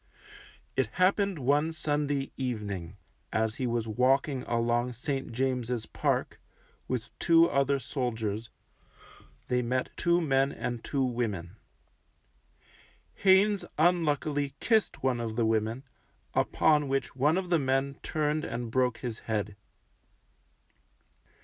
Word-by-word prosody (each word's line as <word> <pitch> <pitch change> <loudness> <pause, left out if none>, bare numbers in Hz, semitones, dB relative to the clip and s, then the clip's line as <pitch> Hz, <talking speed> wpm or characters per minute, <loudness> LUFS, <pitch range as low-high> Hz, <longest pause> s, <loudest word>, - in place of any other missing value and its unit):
It - - +2
happened 195 0 +2
one 145 +4 +2
Sunday 145 -3 -1
evening, 100 -8 -4 0.3
as 110 0 0
he 130 - -1
was 115 -1 -1
walking 130 +4 +2
along 120 +1 +1
St. 135 +3 -3
James's 125 -2 -1
Park, - - -1 0.5
with 125 -4 -3
two 165 0 +5
other 140 -1 +2
soldiers, 115 -5 -3 1.0
they 125 0 +1
met 125 +1 -2
two 170 0 +2
men 135 -4 +2
and 120 -4 -4
two 140 -2 0
women. 110 -8 -2 1.6
Haynes 200 +1 +4
unluckily 150 -4 +1
kissed 220 - +1
one 130 -2 +1
of 115 -2 -3
the 115 -1 +2
women, 110 +3 0 0.5
upon 150 -2 +3
which 135 -2 -2
one 150 +6 +3
of 185 -2 -3
the 170 - +4
men 135 0 0
turned 155 0 -1
and 115 -1 -4
broke 125 -1 +1
his 120 -3 -5
head. 105 -2 -1
130 Hz, 120 wpm, -29 LUFS, 115-150 Hz, 1.6 s, two